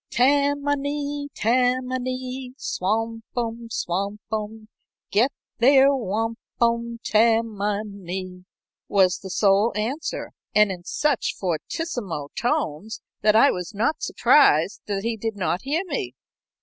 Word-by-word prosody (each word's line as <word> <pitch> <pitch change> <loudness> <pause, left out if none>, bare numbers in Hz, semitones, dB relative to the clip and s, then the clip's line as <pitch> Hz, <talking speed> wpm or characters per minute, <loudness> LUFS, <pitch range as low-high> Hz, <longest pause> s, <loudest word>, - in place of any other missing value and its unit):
"Tam 285 +3 +3
ma 285 0 +2
nee, 285 0 -3
Tam 250 +2 +2
ma 255 - 0
nee; 255 0 -5
Swampum, 225 +3 -3
swampum, 210 +3 -3 0.4
Get 235 +7 +3 0.3
their 270 +3 +6
wampum, 235 +1 -1
Tam 225 +1 +3
ma 205 +1 -1
nee," 185 -2 -7 0.4
was 190 -3 +3
the 190 - -8
sole 200 +3 +3
answer, 260 +9 -3 0.2
and 210 -2 +5
in 175 -2 -7
such 295 +2 0
fortissimo 185 - -3
tones 220 - -1 0.2
that 215 0 +4
I 275 +6 +6
was 180 +3 -5
not 235 +9 0
surprised 195 - +4
that 200 -1 -2
he 230 0 -1
did 225 0 -3
not 185 -2 -1
hear 300 +7 -1
me. 200 - -4
225 Hz, 125 wpm, -24 LUFS, 200-255 Hz, 0.4 s, their